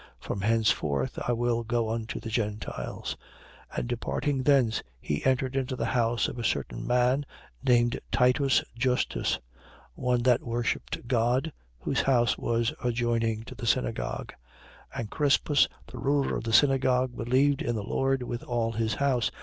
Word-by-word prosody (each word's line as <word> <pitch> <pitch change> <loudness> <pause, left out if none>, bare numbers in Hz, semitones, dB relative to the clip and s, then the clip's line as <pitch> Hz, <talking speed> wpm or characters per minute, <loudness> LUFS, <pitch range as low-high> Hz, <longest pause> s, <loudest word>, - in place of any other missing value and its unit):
From 100 - -4
henceforth 95 -11 +1
I 120 - +2
will 120 0 0
go 115 -1 0
unto 115 -1 -3
the 110 - -7
Gentiles. 105 - -3 0.6
18:7. - - -7
And - - -1
departing 130 +3 -1
thence, 130 -5 +3 0.2
he 75 +3 -3
entered 130 0 +1
into 130 -1 -1
the - - -2
house 120 -2 +2
of 120 - -6
a - - -3
certain - - -2
man, 125 +3 +3 0.4
named 120 -1 +3
Titus 130 +2 +3
Justus, 125 +1 0 0.6
one 125 - 0
that 125 -1 +4
worshipped 120 0 -3
God, 125 +5 +1 0.2
whose - - 0
house 120 -3 +3
was 115 0 0
adjoining 115 -2 0
to - - -9
the 115 - -6
synagogue. 115 - -1 0.6
18:8. - - -4
And 110 - -6
Crispus, 145 0 +3 0.2
the - - -10
ruler 140 0 +1
of - - -4
the 115 - -2
synagogue, 130 -2 +3
believed 130 +4 +2
in 120 - -1
the 105 - -3
Lord, 135 +4 0
with 120 -1 -4
all 115 -2 -1
his 115 0 -1
house. 135 -4 +1
120 Hz, 160 wpm, -28 LUFS, 115-130 Hz, 0.6 s, that